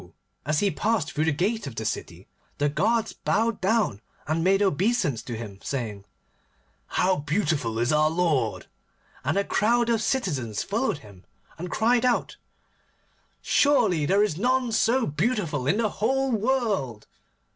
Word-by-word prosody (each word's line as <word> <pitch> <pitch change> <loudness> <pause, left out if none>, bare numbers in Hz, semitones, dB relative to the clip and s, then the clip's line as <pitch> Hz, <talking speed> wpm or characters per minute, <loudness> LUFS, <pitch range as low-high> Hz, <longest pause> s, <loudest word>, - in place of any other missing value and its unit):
as 155 0 +1
he 200 -1 +2
passed 215 -7 0
through 155 +1 0
the 160 - +2
gate 190 +5 -1
of 130 - -7
the 110 - -4
city, - - -5 0.3
the 145 - +1
guards 225 +8 0
bowed 225 -2 0
down 195 - +1 0.2
and 160 +2 -1
made 195 +2 +3
obeisance 195 - +1
to 115 -1 -6
him, 105 -4 -8
saying, 110 -7 -4 0.8
'How 185 0 +1
beautiful 145 - -1
is 120 +5 +1
our 155 0 +4
lord!' 155 -10 0 0.6
and 150 +8 0
a 200 - +2
crowd 235 +4 +1
of 230 -2 +2
citizens 155 - -1
followed 225 - -1
him, 100 -3 -15 0.4
and 180 +2 -5
cried 235 +5 +2
out, 250 -1 0 1.1
'Surely 210 - +3
there 200 +3 +4
is 175 -6 -1
none 250 +1 +1
so 230 +3 +2
beautiful 155 - -1
in 180 - +2
the 225 -2 +1
whole 265 +7 0
world! 215 - -1
185 Hz, 150 wpm, -25 LUFS, 145-230 Hz, 1.1 s, our